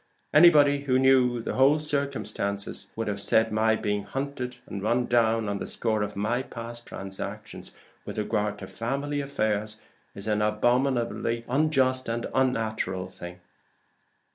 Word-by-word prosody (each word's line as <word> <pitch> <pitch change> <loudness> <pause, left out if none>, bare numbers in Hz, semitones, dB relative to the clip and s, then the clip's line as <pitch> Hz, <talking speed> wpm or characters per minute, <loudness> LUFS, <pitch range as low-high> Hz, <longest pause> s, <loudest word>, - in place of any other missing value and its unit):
Anybody 145 -3 +6
who 130 -2 +3
knew 130 -3 +3
the - - -3
whole 135 +3 +5
circumstances 140 -9 -3
would 105 -3 -2
say 105 +2 +4
that 110 - -9
my 110 +1 +3
being 105 -1 -1
hunted 130 +2 -4
and 100 - -6
run 120 +4 +1
down 115 -2 +2
on 100 0 -2
the - - -5
score 110 -2 -1
of 105 0 -3
my 110 +5 0
past 120 -2 -8
transactions 95 0 -7 0.3
with - - -7
regard 105 -1 -1
to 95 - -8
the 95 - -13
family 140 +7 -2
affairs, 110 -6 -2 0.4
is 100 - -8
an 105 -1 0
abominably 120 +1 +1
unjust 130 -2 +2
and 115 +1 -2
unnatural 110 -8 0
thing." 90 -1 -10
115 Hz, 145 wpm, -27 LUFS, 105-130 Hz, 0.4 s, Anybody